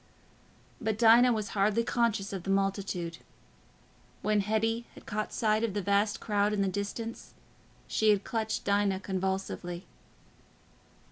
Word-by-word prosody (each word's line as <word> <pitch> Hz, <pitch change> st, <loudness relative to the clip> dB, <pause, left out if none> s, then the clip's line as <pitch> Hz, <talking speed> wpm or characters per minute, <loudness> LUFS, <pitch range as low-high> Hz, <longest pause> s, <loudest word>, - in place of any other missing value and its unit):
But 220 Hz, -2 st, -1 dB
Dinah 235 Hz, +2 st, +7 dB
was 215 Hz, -2 st, -1 dB
hardly 210 Hz, +3 st, +2 dB
conscious 230 Hz, -5 st, 0 dB
of 190 Hz, -, -3 dB
the 195 Hz, -, -7 dB
multitude. 195 Hz, -3 st, -1 dB, 1.0 s
When 210 Hz, 0 st, +2 dB
Hetty 225 Hz, +3 st, 0 dB
had -, -, -14 dB
caught 215 Hz, 0 st, -3 dB
sight 215 Hz, 0 st, +1 dB
of 215 Hz, -4 st, -1 dB
the 205 Hz, -, 0 dB
vast 200 Hz, +2 st, +1 dB
crowd 205 Hz, -1 st, +1 dB
in 200 Hz, -1 st, +1 dB
the -, -, +1 dB
distance, 205 Hz, +4 st, -5 dB, 0.5 s
she 220 Hz, -, +2 dB
had 205 Hz, -2 st, +3 dB
clutched 220 Hz, -1 st, -2 dB
Dinah 200 Hz, -1 st, +1 dB
convulsively. 190 Hz, -2 st, -3 dB
205 Hz, 135 wpm, -30 LUFS, 195-220 Hz, 1.0 s, Dinah